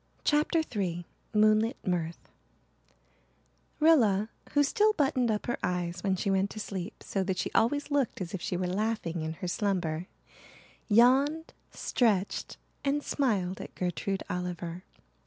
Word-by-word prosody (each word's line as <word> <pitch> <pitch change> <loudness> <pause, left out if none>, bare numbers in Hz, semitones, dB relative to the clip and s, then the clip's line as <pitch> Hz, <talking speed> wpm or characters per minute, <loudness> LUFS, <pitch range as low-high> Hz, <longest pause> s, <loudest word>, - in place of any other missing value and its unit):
CHAPTER 305 +2 +2
III 175 -4 -1 0.3
MOONLIT 215 +3 +3
MIRTH 170 -2 -2 1.5
Rilla, 225 -10 +4 0.2
who 290 - +5
still 425 +8 +3
buttoned 270 - +1
up 210 -1 -1
her 240 - -2
eyes 175 0 -2
when 195 -2 +2
she 195 +2 -1
went 195 +1 +2
to 215 - -8
sleep 190 -3 -5
so 195 - -1
that 185 -1 -2
she - - -2
always 285 +6 +2
looked 280 -5 +1
as 180 -3 -5
if 190 - -4
she 180 - -2
were 185 - -1
laughing 185 -3 -1
in 160 0 -3
her 165 +3 -6
slumber, 180 -4 -1 0.8
yawned, 270 +8 +4 0.2
stretched, 205 -6 0 0.3
and 285 +1 0
smiled 195 -10 0
at - - -9
Gertrude 190 +2 -2
Oliver. 180 0 -4
200 Hz, 140 wpm, -29 LUFS, 180-255 Hz, 1.5 s, who